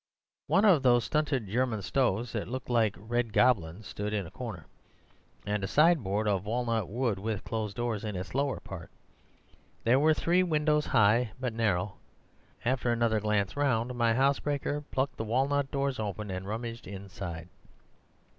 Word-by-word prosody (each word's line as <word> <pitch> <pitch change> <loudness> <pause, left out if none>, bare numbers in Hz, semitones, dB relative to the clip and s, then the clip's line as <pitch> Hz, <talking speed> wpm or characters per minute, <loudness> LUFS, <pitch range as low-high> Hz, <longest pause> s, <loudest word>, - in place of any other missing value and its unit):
One 195 +8 +4
of 180 -9 +6
those 120 -3 +4
stunted 145 -6 0
German 110 0 0
stoves 120 -1 0
that 110 -3 -3
look 130 +1 -5
like 115 -4 +2
red 115 +2 -2
goblins 105 -5 +2
stood 105 +5 -4
in 100 -3 -1
a - - -10
corner, 105 -11 -7 0.8
and 105 -1 -1
a - - 0
sideboard 110 - +3
of 100 -3 +1
walnut 115 -3 0
wood 115 -2 -1
with 105 -1 -3
closed 110 -2 -3
doors 120 -3 -2
in 105 -2 -4
its 90 +1 -5
lower 140 0 0
part. 90 -3 -9 0.9
There 120 +3 +4
were 155 +2 +4
three 175 +4 +2
windows, 150 -3 +1
high 110 +2 +3
but 125 -3 -2
narrow. 105 -3 0 0.7
After 125 0 +1
another 115 -2 +2
glance 105 -2 0
round, 125 -4 +1
my 115 -2 +2
housebreaker 140 +2 +1
plucked 130 0 -1
the - - -2
walnut 135 +5 +1
doors 140 -2 -1
open 105 -1 -4
and 95 +1 -5
rummaged 115 +2 -5
inside. 95 -4 -7
115 Hz, 160 wpm, -29 LUFS, 105-130 Hz, 0.9 s, of